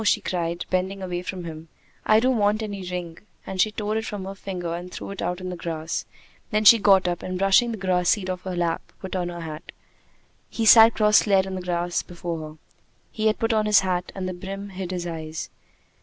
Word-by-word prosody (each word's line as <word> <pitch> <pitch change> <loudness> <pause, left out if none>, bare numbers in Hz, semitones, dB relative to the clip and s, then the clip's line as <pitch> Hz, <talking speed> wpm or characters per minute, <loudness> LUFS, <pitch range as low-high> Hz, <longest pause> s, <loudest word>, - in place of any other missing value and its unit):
she 210 0 +3
cried, 170 -3 -3
bending 190 +1 -1
away 180 -1 -3
from 180 0 -6
him. 160 -1 -8 0.4
"I 215 0 +6
don't 255 0 +2
want 210 +2 +2
any 200 -2 -5
ring!" 175 -2 -5 0.3
and 190 -1 -1
she 215 - +3
tore 210 0 -3
it 220 - -3
from 205 -3 -5
her 195 - -5
finger 180 -4 -5
and 175 +1 -6
threw - - -7
it 200 - -6
out 180 +1 -2
on 185 0 -5
the 180 - -4
grass. 165 -1 -4 0.4
Then 215 0 0
she 230 +2 +9
got 195 -3 +5
up, 175 -1 -2
and, 185 0 -4
brushing 195 +5 +4
the 225 - -4
grass 180 -2 +1
seed 200 -4 +1
off 185 -1 -3
her 185 -1 -5
lap, 170 -1 0 0.2
put 190 -1 -6
on 175 -1 -1
her 175 -1 -7
hat. 155 -2 -8 0.8
He 225 - -2
sat 225 +1 +8
cross 210 0 +4
legged 195 -2 +4
on 190 - -5
the 185 - -4
grass 175 -1 -1
before 170 -1 -6
her. 155 - -14 0.5
He 220 0 0
had 215 - +2
put 225 -1 0
on 215 -1 +1
his 210 -2 +6
hat, 180 -1 -2
and 190 -1 -3
the 185 - -3
brim 195 +3 -7
hid 190 -2 -6
his 180 -1 -3
eyes. 160 -2 -5
185 Hz, 230 wpm, -24 LUFS, 175-205 Hz, 0.8 s, she